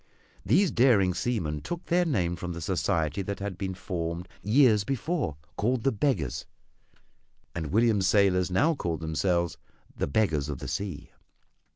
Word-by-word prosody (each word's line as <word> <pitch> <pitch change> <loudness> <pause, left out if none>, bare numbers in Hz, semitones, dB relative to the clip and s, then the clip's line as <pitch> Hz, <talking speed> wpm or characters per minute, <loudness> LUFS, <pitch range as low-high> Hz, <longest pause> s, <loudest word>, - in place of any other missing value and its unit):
These 185 +2 +3
daring 110 -8 +4
seamen 85 -10 -2
took 175 0 -5
their 175 +1 +2
name 90 - 0
from 90 +1 -5
the 85 - -6
society 85 -1 0
that 100 +1 -4
had 100 -1 -4
been 95 0 -4
formed 85 -1 -4
years 110 -1 +4
before 135 - -2 0.2
called 120 +2 0
the 135 - +3
"Beggars." 105 - -1 1.1
And 80 -3 -3
William's 110 -2 +3
sailors 95 -2 +3
now 145 - +3
called 85 - -3
themselves 85 +1 0 0.4
"The - - -1
Beggars 75 -5 +1
of 70 - -3
the - - -7
Sea." 100 -2 -4
95 Hz, 150 wpm, -28 LUFS, 85-120 Hz, 1.1 s, daring